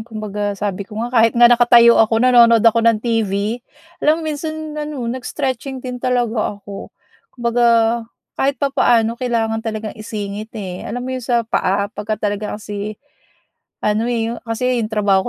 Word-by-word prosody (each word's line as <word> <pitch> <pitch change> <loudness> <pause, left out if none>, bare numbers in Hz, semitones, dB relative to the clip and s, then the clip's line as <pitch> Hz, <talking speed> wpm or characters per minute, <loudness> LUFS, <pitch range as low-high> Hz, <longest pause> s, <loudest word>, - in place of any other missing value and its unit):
Kumbaga 210 -2 -4
sabi 200 -1 -4
ko 210 - -10
nga 245 - -6
kahit 230 0 +3
nga 240 - +6
nakatayo 240 -1 +6
ako, 225 0 +3
nanonood 235 -3 +6
ako 230 0 +5
ng 230 -1 +4
TV. 220 0 -1 0.4
Alam 315 +2 +2
mo 310 - -2
minsan 310 +1 -5
ano 300 -4 -5
nag-stretching 260 +1 -4
din 250 -1 -5
talaga 240 -4 0
ako. 200 -1 -9 0.5
Kumbaga 240 0 +1 0.7
kahit 275 +1 0
papaano 240 -5 +2
kailangan 225 -3 -1
talagang 220 -1 -4
isingit, 215 -1 -6
eh. 185 -3 -6
Alam 245 +3 -4
mo - - -5
'yong 255 -2 -5
sa 240 - +3
paa, 200 -1 -1
pagka 210 +1 -3
talaga 210 0 -3
kasi 210 0 -6 0.9
ano, 215 +2 +1
eh, 230 -1 -1
o - - -11
kasi 245 +1 -1
'yong 215 - -2
trabaho 200 -1 +2
230 Hz, 160 wpm, -18 LUFS, 210-245 Hz, 0.9 s, nga